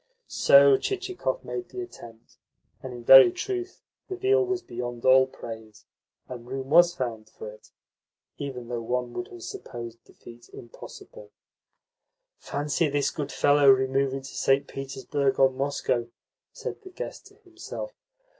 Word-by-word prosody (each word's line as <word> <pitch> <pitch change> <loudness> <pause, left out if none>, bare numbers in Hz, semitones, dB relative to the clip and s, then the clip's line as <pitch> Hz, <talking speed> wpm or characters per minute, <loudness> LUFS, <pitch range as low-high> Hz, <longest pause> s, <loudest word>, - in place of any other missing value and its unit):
So 140 -1 +6
Chichikov 385 +4 -3
made 370 -2 -5
the 375 - -6
attempt; 115 - -14 0.4
and 130 - -7
in 120 -1 -9
very 130 0 +9
truth 375 -2 -5 0.3
the 380 - -3
veal 400 +3 +2
was 375 -1 -2
beyond 120 0 -6
all 130 0 +6
praise, 110 -4 -10 0.4
and 120 -2 -9
room 135 +1 -6
was 175 +2 +6
found 115 -7 -5
for 105 - -9
it, 105 - -18 0.7
even 130 -4 -6
though 120 -1 -4
one 125 +1 -3
would 180 - -5
have 360 -1 -12
supposed 120 - -8
the - - -20
feat 120 0 -15
impossible. 485 - -12 1.1
"Fancy 145 +2 -1
this 145 0 0
good 145 -3 -5
fellow 145 -1 +4
removing 135 +1 +2
to 135 - -10
St. 135 +1 +2
Petersburg 135 0 -2
or 135 0 +5
Moscow!" 130 -3 -2 0.4
said 470 -1 -7
the 380 - -12
guest 430 +7 -8
to 405 - -20
himself. 400 +5 -9
135 Hz, 145 wpm, -26 LUFS, -, 1.1 s, very